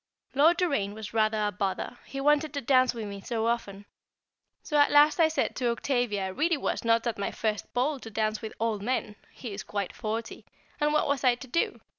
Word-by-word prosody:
Lord 315 +5 +5
Doraine 280 - 0
was 220 -1 -8
rather 215 -1 +2
a 205 - 0
bother, 195 +5 -3
he 275 - -6
wanted 295 +2 +2
to 285 - -1
dance 255 0 +4
with 225 -2 -4
me 200 -1 -7
so 225 +1 -2
often; 205 -4 -2 0.8
so 300 - -4
at 290 - +5
last 295 +3 +5
I 325 - +6
said 315 - -1
to 245 -3 +1
Octavia 235 -5 0
I - - -3
really 310 - +1
was - - -2
not 230 0 +2
at 230 -4 -2
my 200 - -1
first 215 -2 -3
ball 270 +3 +1
to 225 - -9
dance 215 0 -1
with 220 - -6
old 220 -2 -1
men 215 -2 -2
(he 235 -5 -8
is 200 - -5
quite 200 -2 -4
forty), 225 0 -4 0.4
and 295 0 +2
what 305 - +2
was 280 -2 0
I 250 -2 +5
to 260 +2 -11
do? 335 +7 -1
235 Hz, 220 wpm, -28 LUFS, 215-285 Hz, 0.8 s, I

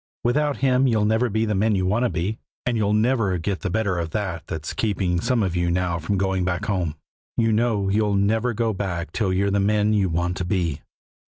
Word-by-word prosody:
Without 145 +4 +1
Him 130 0 +4
you'll 110 -4 +2
never 110 +3 +2
be 110 +2 0
the 105 - 0
men 105 +2 +2
you 95 -1 0
want 105 +6 +1
to - - +1
be, 100 +5 -2 0.3
and 125 - 0
you'll 105 -2 +1
never 110 -3 +2
get 90 +3 -2
the 100 - -3
better 100 -2 0
of 85 -1 -3
that 85 -4 -3
that's 80 -3 -5
keeping 95 -5 0
some 120 0 +1
of 90 -3 -1
you 85 0 +1
now 85 -1 0
from 90 +5 -1
going 95 -1 0
back 90 -1 -1
home. 90 -7 -1 0.4
You 115 -1 +3
know 110 -3 +1
you'll 105 +1 +1
never 110 +4 +1
go 115 0 0
back 90 -3 -3
till 100 -5 0
you're 100 +2 +1
the 100 - +2
men 105 +1 +2
you 100 -3 +2
want 85 +2 -1
to - - -2
be." 85 -5 -1
100 Hz, 230 wpm, -23 LUFS, 90-110 Hz, 0.4 s, Him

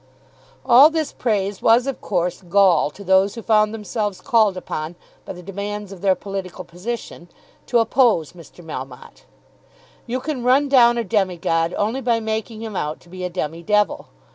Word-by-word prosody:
All 260 +4 +8
this 320 -2 -2
praise 205 -4 -1
was 235 +2 +4
of 275 -1 -4
course 180 -2 -2
gall 185 -4 +3
to 200 +7 -13
those 190 +2 +3
who 230 - -8
found 215 -1 +3
themselves 210 -2 -4
called 220 -7 +2
upon 155 -2 -5 0.3
by - - -6
the 180 0 -11
demands 200 +2 -6
of 190 -3 -10
their 190 -2 +3
political 195 -3 -6
position 180 -1 -7 0.4
to 240 - +2
oppose 225 - +2
Mr. 175 0 -15
Melmotte. 135 -4 -9 0.8
You 250 +2 -2
can 270 -2 -4
run 265 +4 +3
down 240 -3 +5
a 235 - 0
demi 190 -4 0
god 165 0 0
only 225 +6 -1
by 235 -2 +1
making 220 0 -4
him 220 -3 -6
out 150 -3 -3
to 175 - -20
be 185 +1 -8
a 180 - -2
demi 165 -2 -4
devil. 210 +3 0
205 Hz, 175 wpm, -21 LUFS, 180-235 Hz, 0.8 s, All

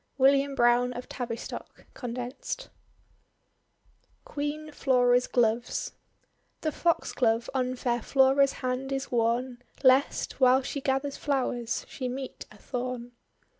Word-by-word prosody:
WILLIAM 275 +1 +4
BROWNE 240 0 +3
OF 245 +1 -7
TAVISTOCK 235 -3 -6
(condensed) 250 - -5 1.6
QUEEN 300 +1 -4
FLORA'S 250 -3 +3
GLOVES 235 0 0 0.7
The 310 - 0
Foxglove 240 -8 +1
on 255 -1 0
fair 240 -1 -1
Flora's 270 +2 +4
hand 255 +2 -2
is 270 0 -3
worn, 240 +1 0 0.2
Lest, 265 +1 +3
while 260 0 +5
she 280 +2 -4
gathers 270 +1 -1
flowers, 250 -5 -1
she 255 -2 -4
meet 260 +1 -6
a - - -15
thorn. 245 -1 -4
255 Hz, 110 wpm, -28 LUFS, 245-275 Hz, 1.6 s, while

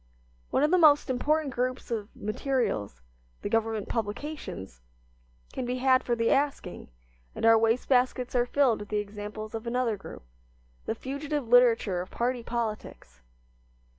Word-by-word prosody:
One - - +1
of 300 - +3
the 365 - +5
most 295 -4 +5
important 290 +2 0
groups 250 0 -2
of 215 -2 -3
materials, 215 - -2 0.4
the - - -2
government 225 -2 0
publications, 210 - -5 0.7
can 260 - -3
be 250 +1 -2
had 260 0 +3
for 240 - 0
the 230 0 +1
asking; 275 -10 -1 0.5
and - - -2
our 225 0 +8
waste 225 +2 +2
baskets 250 -1 +1
are 245 -1 +2
filled 260 -4 +2
with 205 -1 -8
the 210 - -1
examples 210 +1 -6
of 225 +1 -5
another 235 -2 0
group, 195 - -11 0.6
the - - -1
fugitive 280 0 -4
literature 230 -6 +4
of 185 - -8
party 245 +1 -1
politics. 215 - -5
240 Hz, 150 wpm, -28 LUFS, 215-260 Hz, 0.7 s, our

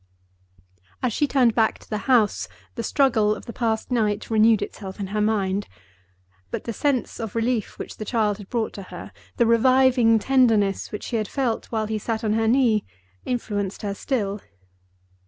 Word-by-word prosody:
As 250 -3 +1
she 295 - +1
turned 250 -5 +3
back 220 -1 +2
to - - -19
the 215 - -3
house, 230 -5 +3 0.3
the - - -4
struggle 225 -4 +2
of - - -11
the 235 - -7
past 225 0 -1
night 215 -3 0
renewed 220 0 +4
itself 190 -2 -8
in 200 - -2
her 210 - +1
mind. 205 -2 0 0.8
But - - -4
the 230 - -4
sense 275 0 -1
of 225 -2 -5
relief 230 -1 -1
which - - -7
the - - -5
child 215 -2 0
had 200 - -11
brought 230 -3 -1
to 200 - -7
her, 180 - -9 0.3
the 235 - +4
reviving 245 0 +4
tenderness 220 -5 +2
which 210 - -6
she 235 - -2
had 215 -2 -2
felt 250 -3 -2
while 220 -2 -1
he 215 0 -2
sat 225 +1 -3
on 215 -1 +1
her 225 0 +1
knee, 230 -3 +3 0.4
influenced 205 -6 -3
her 200 -1 -2
still. 205 -3 -2
225 Hz, 180 wpm, -24 LUFS, 210-240 Hz, 0.8 s, renewed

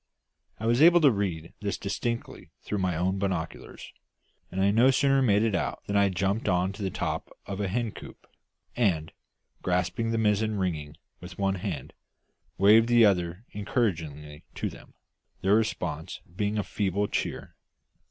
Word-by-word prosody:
I 110 - -4
was 120 +3 +3
able 175 +2 +8
to 145 -3 +6
read 90 -6 -3
this 100 -1 -2
distinctly 115 +4 -4
through 105 - -3
my 90 -2 0
own 95 +3 0
binoculars; 90 -4 -4 0.6
and 95 - -4
I 100 +1 +4
no 120 +5 +5
sooner 135 +1 +3
made 105 -4 +3
it 115 -2 +1
out 75 -9 -2
than 100 - -3
I 100 -1 +4
jumped 95 +4 -1
on 90 +1 +1
to 105 - -10
the 95 - -1
top - - -3 0.2
of 100 +1 -4
a 100 - 0
hen 115 +3 -1
coop, - - -12 0.5
and, 85 -9 +1 0.5
grasping 90 +5 0
the 115 - 0
mizzen 110 0 +1
rigging 80 -5 -3 0.2
with 90 0 -10
one 95 -1 +1
hand, - - -5 0.6
waved 110 +4 +6
the 120 -1 +6
other 90 +1 0
encouragingly 80 - -2
to - - -3
them, - - -15 0.5
their 95 +2 +3
response 105 -8 -1 0.2
being 105 +1 -1
a 105 - 0
feeble 100 0 -1
cheer. - - -4
100 Hz, 160 wpm, -27 LUFS, 90-110 Hz, 0.6 s, able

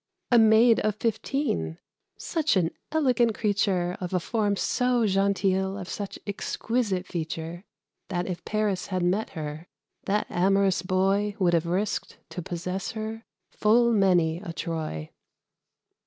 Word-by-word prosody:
a 240 - +7
Maid 225 +1 +6
of 215 -1 0
fifteen 220 - -1 0.4
such 320 -6 0
an 170 -3 +2 0.2
elegant 250 -7 +2
creature, 195 -4 +1
Of 180 0 -3
a - - +3
form 205 +2 0
so 250 +3 +1
genteel, 195 -1 +1
of 185 -3 -6
such 200 +1 -5
exquisite 205 -1 -1
feature, 165 +2 -5 0.4
That 180 -2 -2
if 180 -2 -5
Paris 210 -3 -1
had 185 -2 -1
met 190 +5 +1
her, 155 +2 -5 0.4
that 205 +2 +1
amorous 195 0 +2
boy 195 +3 +1
Would 180 -4 +2
have 170 0 +2
risked, 190 +4 -2
to 180 - -5
possess 180 +2 -4
her, 220 +1 -5 0.3
full 235 +2 +3
many 175 -5 +3
a 175 -3 -7
Troy. 155 - -4
195 Hz, 135 wpm, -26 LUFS, 175-215 Hz, 0.4 s, a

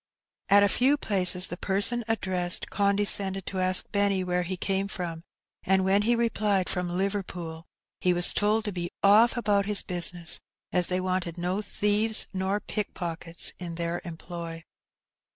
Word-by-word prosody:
At 200 0 +6
a - - +5
few 260 +8 +2
places 185 -6 +1
the 175 - -6
person 205 +6 +1
ad 225 -1 -1
dressed 180 -1 0
condescended 200 -1 +2
to 190 - -4
ask 185 0 +3
Benny 200 -2 +1
where 180 0 -1
he 180 +1 -4
came 195 +1 -1
fipom, 170 -4 -5 0.4
and 190 0 +2
when 195 +2 +3
he 235 +3 +2
replied 210 -5 0
"from 180 -1 -2
Liverpool," 180 -3 -4 0.3
he 180 - +1
was 175 0 +5
told 215 +1 +1
to 210 - -2
be 175 -2 -4
oflF 215 +5 +5
about 205 -3 +1
his 210 -1 +5
business, 175 -1 0 0.3
as 180 -1 +4
they 185 0 -1
wanted 185 -2 -3
no 180 +4 -2
thieves 210 +1 +1
nor 190 +2 -1
pick 210 -1 -5
pockets 170 -1 -2
in 170 -2 -6
their 170 0 -3
employ. 165 -1 -8
190 Hz, 165 wpm, -26 LUFS, 175-205 Hz, 0.4 s, At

